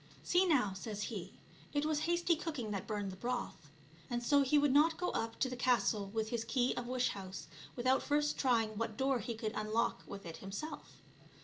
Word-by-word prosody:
" - - -23
See 360 +2 +3
now." 250 - +3
says 205 +2 -4
he, - - -5 0.2
" - - -23
it 290 +1 +2
was 310 -1 +1
hasty 345 0 +3
cooking 300 -10 -4
that 195 -2 -3
burned 205 -2 -2
the - - -8
broth 240 - -4 0.2
;" 160 0 -24
and 240 0 -1
so 285 +4 +5
he 275 +2 +4
would 290 -2 +4
not 320 +3 +5
go 360 0 -1
up 225 0 -2
to - - +4
the 255 - -4
castle 240 -5 +2
with 220 +2 -2
his 235 -1 -1
key 245 +2 +1
of 245 - -4
wish 255 0 +1
house 190 -1 -6 0.3
without 255 +2 +3
first 295 0 +1
trying 235 -5 +2
what 225 -2 -2
door 265 -1 +2
he 230 +2 -4
could 220 -1 -3
unlock 215 +2 0
with 200 -1 -8
it 165 -1 -6
himself. 200 +11 -7
240 Hz, 220 wpm, -35 LUFS, 215-285 Hz, 0.3 s, so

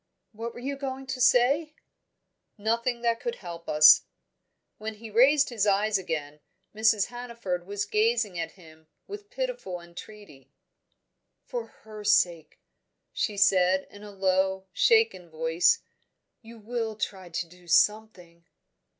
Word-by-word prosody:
"What 230 +1 -7
were - - -8
you 275 +3 -4
going 270 -1 -5
to 260 0 -5
say?" 275 +5 +3 0.8
"Nothing 235 +3 -1
that 235 -1 +1
could 475 0 -4
help 170 - -9
us." 150 0 +8 0.8
When 215 0 -5
he 220 +1 -11
raised 275 +6 +4
his 220 -4 -1
eyes 205 +1 +2
again, 150 -4 -5 0.3
Mrs. 220 -1 +2
Hannaford 235 -8 -5
was 200 0 -3
gazing 215 -3 0
at 165 - -4
him 160 -3 -18 0.2
with 410 0 -9
pitiful - - -4
entreaty. 170 -5 -13 0.9
"For 485 -2 -5 0.2
her 215 -1 -10
sake," 175 -6 +1 0.6
she 210 -3 -2
said, 190 -1 +3
in 205 - -13
a 210 - -10
low, 190 -1 0
shaken 445 - +2
voice, 160 - +2 0.6
"you 230 0 -13
will 225 0 -4
try 190 -3 -5
to 170 +1 -4
do 180 +1 -19
something?" 180 -4 +1
210 Hz, 135 wpm, -27 LUFS, 180-240 Hz, 0.9 s, us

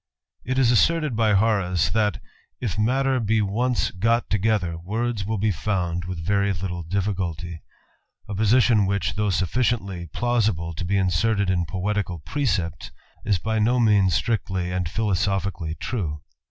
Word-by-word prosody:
It 130 +2 -2
is 125 -3 +4
asserted 150 +3 +2
by 110 -2 +3
Horace, 95 -5 +2
that 105 -4 +1 0.2
" - - -42
if 110 -8 -2
matter 130 +5 +1
be 110 -1 +1
once 115 +4 0
go 115 +5 +2
" - - -43
together, 100 -4 +1
words 105 +4 -3
will 110 0 -1
be 105 +2 +1
found 90 -2 -2
with 85 -3 -5
very 100 +1 +2
little 90 0 -4
difficulty; 85 -2 -3 0.7
a 105 - -5
position 110 0 +3
whicli, 100 -2 0
though 105 -1 0
sufficiently 95 -2 0
plausible 105 -5 0
to 90 - -5
be 100 +3 +1
inserts 95 +2 +1
in 90 -2 0
poetical 95 0 -2
precepts, 85 - -2 0.4
is 105 -4 +2
by 110 +5 -1
no 120 +4 +2
means 100 -6 +4
strictly 95 -3 -1
and 90 -1 -1
philc 105 +3 -1
sophically 95 -5 -2
true. 80 -11 -3
100 Hz, 155 wpm, -24 LUFS, 90-110 Hz, 0.7 s, is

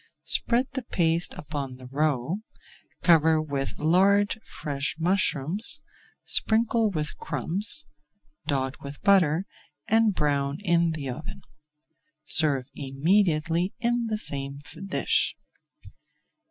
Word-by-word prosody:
Spread 245 +2 +2
the 265 - -3
paste 170 -7 0
upon 140 -3 -6
the 130 0 -13
roe, 145 +5 -1 0.6
cover 160 -2 +4
with 140 -3 -4
large 200 +6 +2
fresh 140 -1 -4
mushrooms, 180 - +2 0.4
sprinkle 225 0 +2
with 155 -5 -3
crumbs, 165 - +2 0.6
dot 135 -2 -2
with 140 +1 -8
butter, 185 -3 +3 0.4
and 220 -2 +3
brown 140 -1 0
in 170 -3 +2
the 145 -3 -5
oven. 130 +5 -7 0.8
Serve 145 -5 +3
immediately 165 +5 0
in 240 0 0
the 215 -1 -2
same 140 -7 -3 0.3
dish. 190 - +1
160 Hz, 100 wpm, -26 LUFS, 140-200 Hz, 0.8 s, cover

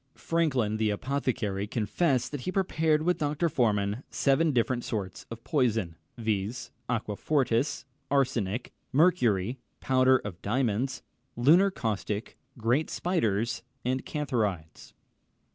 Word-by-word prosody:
Franklin, 135 -11 +1
the 110 -1 +1
apothecary, 105 -4 -1
confessed 125 +6 0
that 145 -3 -4
he 185 - -3
prepared 160 -5 +1
with 180 +2 +1
Dr. 150 +3 0
Forman 105 -4 +1
seven 150 +3 +2
different 120 -1 +1
sorts 100 -4 -4
of 115 0 -8
poisons, 115 - +1 0.2
viz. 110 +1 -2 0.2
aquafortis, 120 +3 0 0.2
arsenic, 125 -5 0 0.2
mercury, 125 - +3 0.2
powder 130 0 +4
of 100 -7 -8
diamonds, 125 +3 0 0.3
lunar 165 +11 +5
caustic, 110 - -3 0.2
great 120 +7 +1
spiders, 115 - 0 0.2
and 130 +1 0
cantharides. 105 - -3
125 Hz, 110 wpm, -28 LUFS, 105-145 Hz, 0.3 s, lunar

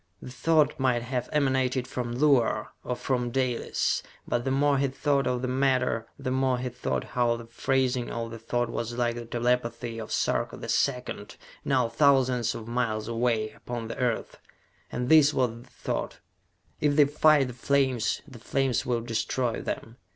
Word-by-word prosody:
The 125 - -9
thought 150 +2 +2
might 125 -3 +2
have 125 0 -3
emanated 130 -3 +1
from 120 -2 -4
Luar, 125 -6 +3
or 125 - -2
from 125 -1 -1
Dalis. 125 -1 0 0.3
But 120 +1 -1
the - - +1
more 140 +1 +2
he 140 - +2
thought 140 +1 0
of 125 0 -1
the - - 0
matter, 130 -3 +1
the 135 -2 -3
more 130 -1 +2
he 125 +1 -3
thought 125 +1 -2
how 120 -1 +1
the 115 0 -8
phrasing 125 +1 0
of 115 -1 -4
the 115 - -7
thought 120 +2 -1
was 120 0 -4
like 120 -1 +1
the 120 0 -6
telepathy 120 -1 -1
of 110 - -7
Sarka - - 0
the - - -7
Second, 125 -6 -1 0.3
now 130 -4 +2
thousands 125 -2 +3
of 110 - -7
miles 115 -3 -1
away, 115 -2 0
upon 120 -2 -6
the - - -5
Earth. 120 -3 -1 0.5
And 125 - -2
this 150 0 +6
was 125 -3 +2
the 115 +1 -13
thought: - - -4 0.6
"If 145 -1 +2
they 145 -1 +7
fight 145 -2 +4
the - - -7
flames, 130 -1 +1
the 130 -5 -12
flames 130 0 0
will 120 -2 +1
destroy 115 +1 -1
them! 115 +2 -5
125 Hz, 175 wpm, -27 LUFS, 115-135 Hz, 0.6 s, they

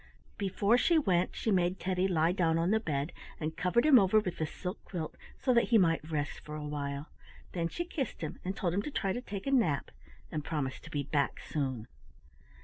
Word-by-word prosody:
Before 200 +4 +2
she 335 +5 +4
went 185 - +2
she 220 - -1
made 180 -1 +2
Teddy 185 0 +1
lie 165 -2 +3
down 165 -3 +2
on 170 +3 +2
the 220 - +4
bed, 150 -5 -2 0.3
and 155 0 -3
covered 180 - +2
him 285 -5 +8
over 200 +2 +5
with 185 -5 -4
the 155 - 0
silk 180 +5 -6
quilt, 165 -5 -5 0.2
so 255 - +2
that 235 - +5
he 235 - +4
might 165 -5 +2
rest 150 -2 -2
for 150 - -8
a 150 -1 -5
while. 145 0 -4 0.4
Then 170 -2 -1
she 345 - -3
kissed 290 -6 -4
him 155 - -5
and 190 +2 -3
told 175 -3 0
him 200 - +1
to 260 - -4
try 195 -9 -1
to 245 - -3
take 200 -5 -6
a 275 - 0
nap, 175 - +2 0.4
and 150 - -2
promised 135 -5 -3
to - - -9
be 145 -1 -2
back 140 0 0
soon. 130 -7 -2
175 Hz, 220 wpm, -31 LUFS, 150-205 Hz, 0.4 s, him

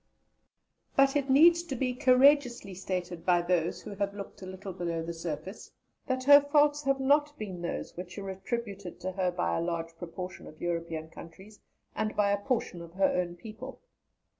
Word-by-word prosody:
But 275 0 +4
it 280 -1 0
needs 335 +5 +7
to 340 -6 -5
be 250 0 -1
courageously 250 -4 +4
stated 180 -2 -4
by 175 -1 +3
those 175 -1 0
who - - -7
have 200 0 -2
looked 200 -1 -9
a 185 - -7
little 190 +1 -7
below 170 -2 -3
the 170 +1 -4
surface 165 +4 -6 0.4
that 260 -1 -1
her 285 +2 +9
faults 290 0 +3
have 275 0 +2
not 290 +2 +2
been 190 -5 -6
those 170 - -4
which 180 +2 -8
are 195 -1 -5
attributed 195 -2 -5
to 185 - -3
her 185 -1 0
by 85 - -1
a - - 0
large 165 -1 -3
proportion 180 +2 -7
of 155 - -13
European 165 -2 -3
countries, 190 +7 -13 0.4
and 215 0 -2
by 205 -1 +3
a 200 0 0
portion 235 -9 -1
of 170 0 -11
her 190 +1 +2
own 175 -1 -1
people. 220 +8 -9
195 Hz, 185 wpm, -29 LUFS, 175-255 Hz, 0.4 s, her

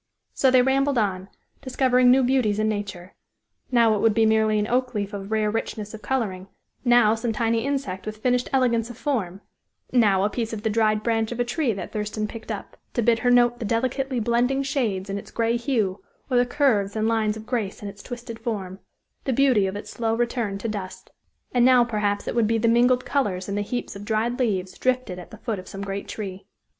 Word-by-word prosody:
So 265 - +3
they 255 -1 +5
rambled 275 +1 +2
on, 195 -3 -1 0.3
discovering 255 -1 +3
new 260 +1 +5
beauties 245 -5 +2
in 215 0 +1
nature; 200 -4 -4 0.6
now 235 -3 +4
it 210 - 0
would 220 0 +3
be 225 -1 +4
merely 220 -1 +3
an 210 - +1
oak 250 +1 0
leaf 205 0 -2
of 200 +1 -6
rare 215 -1 +1
richness 215 -1 -4
of 220 - -8
coloring; 200 -8 -2 0.4
now 240 -3 +5
some 225 +1 -2
tiny 225 0 0
insect 265 -9 -3
with 215 0 -5
finished 250 +2 0
elegance 235 -3 +2
of 240 - -9
form; 210 - -2 0.5
now 205 -6 +4
a 205 - +2
piece 230 0 -3
of 210 -1 -5
the 220 - 0
dried 215 -1 +2
branch 225 -1 0
of 240 - -5
a - - +3
tree 245 +1 0
that 195 - -6
Thurston 210 0 -3
picked 225 +1 -8
up, - - -7 0.2
to 240 - +1
bid 230 0 +3
her 245 - +1
note 240 -1 +4
the - - -4
delicately 255 +4 -1
blending 245 +4 +1
shades 220 -9 -1
in 200 +1 -3
its - - -12
gray 230 0 0
hue, 230 -6 -1 0.3
or 250 - +3
the 245 0 +3
curves 230 -8 +1
and 220 0 +1
lines 220 -1 +1
of 220 - -10
grace 220 -5 -3
in - - -4
its 200 0 -9
twisted 240 -2 -8
form 195 -5 -4 0.5
the 270 - 0
beauty 250 -6 +3
of 190 - -4
its 205 - -7
slow 225 -1 -1
return 235 -4 -1
to 215 - -4
dust; 200 -4 -6 0.4
and 245 -1 +3
now 250 -1 +6
perhaps 210 -3 -1
it - - -1
would 230 -2 +2
be 225 +1 +2
the 230 +1 +1
mingled 245 +2 +3
colors 195 -10 -1
in 200 - -3
the 205 - 0
heaps 245 +3 -4
of 200 - -8
dried 225 +3 -1
leaves 190 -7 -1
drifted 255 -8 0
at 180 - -11
the - - -11
foot 220 -5 -3
of 185 - -11
some 195 0 -7
great 195 0 -4
tree. 195 -3 -6
225 Hz, 220 wpm, -24 LUFS, 205-245 Hz, 0.6 s, now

